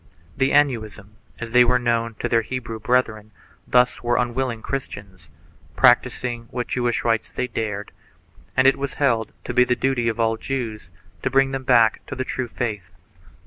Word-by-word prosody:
The 135 0 +1
Anusim, 110 -7 0 0.2
as 115 -1 -7
they 125 +1 +7
were 125 +1 +3
known 115 -2 -1
to - - 0
their 115 -1 +2
Hebrew 115 -1 -5
brethren, 110 -3 0 0.4
thus 125 0 +3
were 120 0 +1
unwilling 120 -1 -1
Christians, 95 - -6 0.5
practising 120 -2 +2
what 125 -1 -4
Jewish 120 -1 -1
rites 115 -1 0
they 125 - -3
dared, 105 -4 -4 0.7
and 130 - +4
it 135 - +5
was 140 0 -4
held 115 -6 +1
to 120 - -5
be 125 0 +5
the 125 0 +1
duty 130 -3 0
of 115 0 -4
all 115 0 +1
Jews 115 -6 -5 0.3
to - - -1
bring 135 +1 +3
them 135 -1 -4
back 115 -3 +4
to - - -6
the 130 - -3
true 130 -1 -3
faith. 105 -6 -4
120 Hz, 175 wpm, -22 LUFS, 115-130 Hz, 0.7 s, they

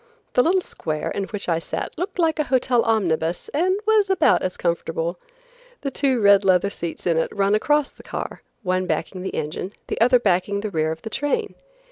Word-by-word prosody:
The 250 - +5
little 365 +7 +3
square 155 - -4
in 200 - -2
which 205 0 -6
I 165 -2 +1
sat - - -5
looked 360 +4 -4
like 330 -2 +1
a 305 - +2
hotel 255 -2 +2
omnibus 175 -7 0
and 365 +6 +1
was 430 -2 +3
about 370 -5 +4
as 185 - -3
comfortable. 170 0 -2 0.6
The 275 - -3
two 265 -3 +1
red 200 -1 +6
leather 190 +1 +3
seats 170 -4 -6
in 170 -2 +2
it 165 - +1
run 200 0 +1
across 295 +7 +2
the - - -16
car, - - -6 0.2
one 185 -1 0
backing 185 0 -2
the 190 - -4
engine, 165 +6 -4
the - - -4
other 250 +2 +6
backing 200 -2 +1
the 215 -1 -4
rear 160 -2 0
of 160 0 -7
the 220 - -6
train. 355 - -1
200 Hz, 200 wpm, -23 LUFS, 175-280 Hz, 0.6 s, red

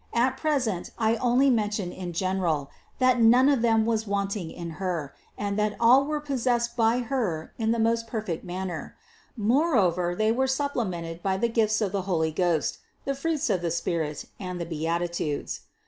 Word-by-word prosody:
At 255 +3 +2
present 260 - -1
I 225 0 +2
only 255 +3 +3
mention 210 -5 0
in 180 -1 -6
general, 170 -5 -1 0.3
that 255 -2 +3
none 245 +4 +6
of 280 -4 +3
them 225 -2 +3
was 225 -1 0
wanting 200 -3 -2
in 170 0 -7
Her, 165 -7 -2 0.2
and 205 0 -2
that 210 0 0
all 250 +4 +6
were 300 +1 -1
possessed 245 -4 0
by 230 +1 +3
Her 225 - -2
in 220 -1 0
the 235 - +1
most 230 0 +1
perfect 215 -7 -4
manner; 180 -2 -5 0.4
moreover 205 - +2
they 215 +3 +2
were 260 +3 +1
supplemented 205 - -2
by 190 0 0
the 235 +4 +1
gifts 220 -1 +1
of 200 -3 0
the 200 -1 -1
Holy 160 -3 +1
Ghost, 170 -2 0 0.3
the 275 - 0
fruits 305 +2 -1
of 180 - 0
the 170 - -1
Spirit, 165 -3 -2
and 180 -2 -5
the 170 - -3
Beatitudes. 165 -1 -2
215 Hz, 175 wpm, -26 LUFS, 175-240 Hz, 0.4 s, none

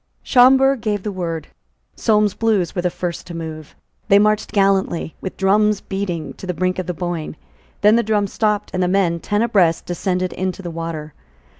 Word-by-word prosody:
Schomberg 265 0 +5
gave 210 -3 -1
the 210 - -3
word. 165 -4 -4 0.5
Solmes's 210 -3 +2
Blues 210 -7 0
were 180 - -1
the 180 - +1
first 175 -1 -5
to 170 - -7
move. 155 -2 -7 0.3
They 200 -1 +6
marched 215 +1 +2
gallantly, 195 -5 +1
with 190 - -6
drums 210 +2 +3
beating, 190 -5 -4
to 190 - -9
the 180 - -2
brink 185 +2 -1
of 185 - -4
the 180 - -2
Boyne. 175 -3 -4 0.5
Then 210 +2 +5
the - - +4
drums 210 -3 0
stopped; 210 -2 0
and 185 - -1
the 180 - +2
men, 180 -3 +1
ten 205 +5 0
abreast, 180 -8 +2
descended 180 +1 -2
into 185 +1 -3
the 175 - -5
water. 165 -2 -5
190 Hz, 185 wpm, -20 LUFS, 175-210 Hz, 0.5 s, They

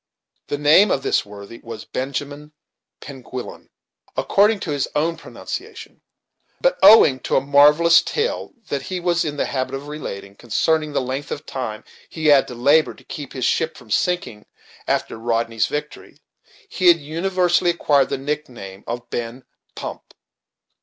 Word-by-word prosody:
The 145 - -2
name 155 +8 +5
of 135 - 0
this - - 0
worthy 100 +2 -11
was 115 -1 -9
Benjamin 145 +3 -5 0.5
Penguillan, 130 -2 -9 0.5
according 205 +1 +3
to 160 - -4
his 145 -2 -1
own 160 +3 +1
pronunciation; - - -9 0.6
but, - - +1
owing 145 -12 +7
to - - -2
a - - +5
marvellous 150 +4 +6
tale 455 +2 -2 0.2
that 140 - -2
he 185 -1 -5
was 175 -1 +1
in 145 -2 -4
the - - 0
habit 130 -1 -3
of 140 +2 -7
relating, 100 -10 -7
concerning 150 +8 0
the 140 - +1
length 130 +3 -4
of 150 - -6
time 115 -5 -5 0.3
he 160 -1 -6
had 145 -3 +5
to 125 - -8
labor 140 +3 +3
to - - -19
keep 145 -3 -8
his 130 -2 -2
ship 160 -4 0
from 120 -4 -15
sinking 175 - -1 0.4
after - - -1
Rodney's 115 -1 0
victory, 150 0 -6 0.5
he 185 - 0
had 170 -1 +8
universally 175 +3 0
acquired 145 -5 +2
the - - -2
nick 150 +2 -4
name 95 -5 -11
of 120 +1 -5
Ben 120 +2 -5 0.3
Pump. - - -8
145 Hz, 160 wpm, -21 LUFS, 125-160 Hz, 0.6 s, had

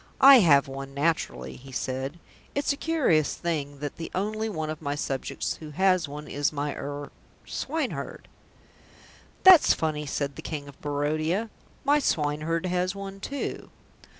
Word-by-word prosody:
"I 270 -1 +10
have 145 -9 +5
one 135 0 -7
naturally," 140 - -1
he 135 +2 -12
said. 130 +4 -3 0.4
"It's 285 0 +1
a - - -5
curious 280 - +2
thing 145 -4 -3
that 145 -1 -4
the 165 - -5
only 215 +3 -1
one 155 -6 -3
of 155 - -7
my 145 -1 -2
subjects 135 -2 -3
who 155 - -9
has 185 +2 +2
one 150 +1 -8
is 145 +1 0
my 145 -1 -2
er 145 0 -6 0.3
swineherd." 300 -2 -4 1.2
"That's 370 -4 +8
funny," 150 -2 -2
said 140 0 -2
the - - -6
King 145 -3 -5
of 140 - -14
Barodia. 155 +8 -1 0.3
"My 290 +1 +4
swineherd 155 - 0
has 180 +1 0
one 195 0 -7
too." 280 +7 -4
155 Hz, 150 wpm, -27 LUFS, 145-195 Hz, 1.2 s, I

